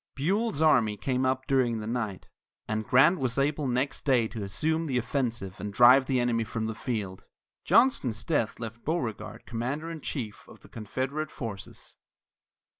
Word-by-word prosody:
Buell's 185 Hz, -, 0 dB
army 115 Hz, -9 st, +4 dB
came 130 Hz, +4 st, 0 dB
up 130 Hz, 0 st, -1 dB
during 125 Hz, -5 st, +1 dB
the 105 Hz, -, -6 dB
night, 110 Hz, -4 st, -3 dB, 0.4 s
and 110 Hz, 0 st, -2 dB
Grant 150 Hz, +8 st, +5 dB
was 130 Hz, -1 st, 0 dB
able 145 Hz, +1 st, 0 dB
next 130 Hz, +3 st, -1 dB
day 125 Hz, -5 st, +3 dB
to 110 Hz, -, -6 dB
assume 160 Hz, +12 st, -1 dB
the 130 Hz, -3 st, 0 dB
offensive 115 Hz, -6 st, -2 dB
and 105 Hz, -, -4 dB
drive 125 Hz, +5 st, +6 dB
the 130 Hz, -2 st, +1 dB
enemy 120 Hz, -2 st, +1 dB
from 110 Hz, 0 st, -4 dB
the 110 Hz, -, -2 dB
field. 105 Hz, -5 st, -4 dB, 0.4 s
Johnston's 125 Hz, -, +3 dB
death 120 Hz, -8 st, -1 dB
left 115 Hz, 0 st, -7 dB
Beauregard 130 Hz, -, -3 dB
commander 130 Hz, +8 st, -3 dB
in 160 Hz, -2 st, -7 dB
chief 115 Hz, -9 st, -5 dB
of -, -, -15 dB
the -, -, -17 dB
Confederate 130 Hz, +8 st, -4 dB
forces. 110 Hz, -7 st, -8 dB
125 Hz, 165 wpm, -28 LUFS, 110-140 Hz, 0.4 s, drive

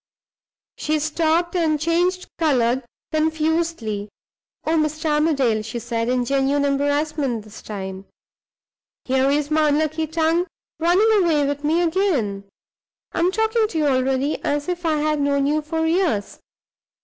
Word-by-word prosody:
She 310 Hz, 0 st, 0 dB
stopped, 320 Hz, +3 st, 0 dB
and 315 Hz, -4 st, +1 dB
changed 350 Hz, +3 st, +1 dB
color 260 Hz, -5 st, +2 dB, 0.3 s
confusedly. 315 Hz, -9 st, -1 dB, 0.6 s
"Oh, 320 Hz, -, +1 dB
Mr. 310 Hz, 0 st, -1 dB
Armadale," 280 Hz, -8 st, +2 dB
she 220 Hz, +2 st, -6 dB
said, 230 Hz, 0 st, -2 dB
in 250 Hz, -1 st, +1 dB
genuine 275 Hz, +2 st, +1 dB
embarrassment 285 Hz, -3 st, 0 dB
this 215 Hz, 0 st, -12 dB
time, 190 Hz, -2 st, -6 dB, 1.0 s
"here 265 Hz, +1 st, +2 dB
is 290 Hz, +1 st, 0 dB
my 305 Hz, -1 st, +3 dB
unlucky 310 Hz, +2 st, 0 dB
tongue 325 Hz, +3 st, +1 dB, 0.3 s
running 390 Hz, +5 st, +4 dB
away 305 Hz, -4 st, +2 dB
with 285 Hz, +1 st, -3 dB
me 325 Hz, +4 st, +2 dB
again! 310 Hz, -, 0 dB, 0.7 s
I -, -, -3 dB
am 350 Hz, +2 st, +3 dB
talking 445 Hz, +1 st, +1 dB
to 345 Hz, -, -5 dB
you 305 Hz, -, +2 dB
already 265 Hz, +1 st, 0 dB
as 290 Hz, 0 st, -1 dB
if 350 Hz, -1 st, -2 dB
I 315 Hz, -, +2 dB
had 305 Hz, 0 st, 0 dB
known 280 Hz, -1 st, +1 dB
you 300 Hz, +2 st, +1 dB
for 320 Hz, +1 st, -2 dB
years! 320 Hz, -, 0 dB
305 Hz, 140 wpm, -22 LUFS, 270-330 Hz, 1.0 s, running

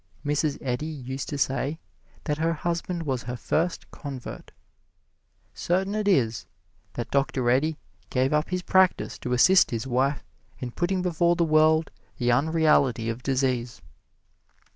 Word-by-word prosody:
Mrs. 145 Hz, 0 st, 0 dB
Eddy 130 Hz, +3 st, -2 dB
used 135 Hz, -3 st, -5 dB
to 145 Hz, -, -3 dB
say 140 Hz, +3 st, -1 dB, 0.4 s
that 150 Hz, -1 st, -2 dB
her 165 Hz, +1 st, +1 dB
husband 170 Hz, +1 st, -3 dB
was 130 Hz, -5 st, -2 dB
her 125 Hz, +1 st, -5 dB
first 165 Hz, +8 st, -2 dB
convert; 135 Hz, -5 st, -8 dB, 1.0 s
certain 190 Hz, +3 st, -1 dB
it 215 Hz, -1 st, -1 dB
is 120 Hz, -, +1 dB, 0.5 s
that 120 Hz, -, -5 dB
Dr. 135 Hz, -2 st, 0 dB
Eddy 150 Hz, +5 st, +1 dB, 0.3 s
gave 130 Hz, +2 st, +1 dB
up 150 Hz, +1 st, +1 dB
his 180 Hz, 0 st, -2 dB
practise 185 Hz, 0 st, +2 dB
to 125 Hz, -, -3 dB
assist 185 Hz, +9 st, +5 dB
his 115 Hz, +1 st, -3 dB
wife 135 Hz, +3 st, 0 dB, 0.3 s
in 125 Hz, -1 st, -5 dB
putting 180 Hz, +5 st, -1 dB
before 175 Hz, -1 st, +2 dB
the 170 Hz, -1 st, +2 dB
world 155 Hz, 0 st, +3 dB, 0.3 s
the 120 Hz, -1 st, +1 dB
unreality 140 Hz, -4 st, +2 dB
of 115 Hz, +2 st, -7 dB
disease. 130 Hz, -4 st, -1 dB
145 Hz, 140 wpm, -26 LUFS, 125-165 Hz, 1.0 s, assist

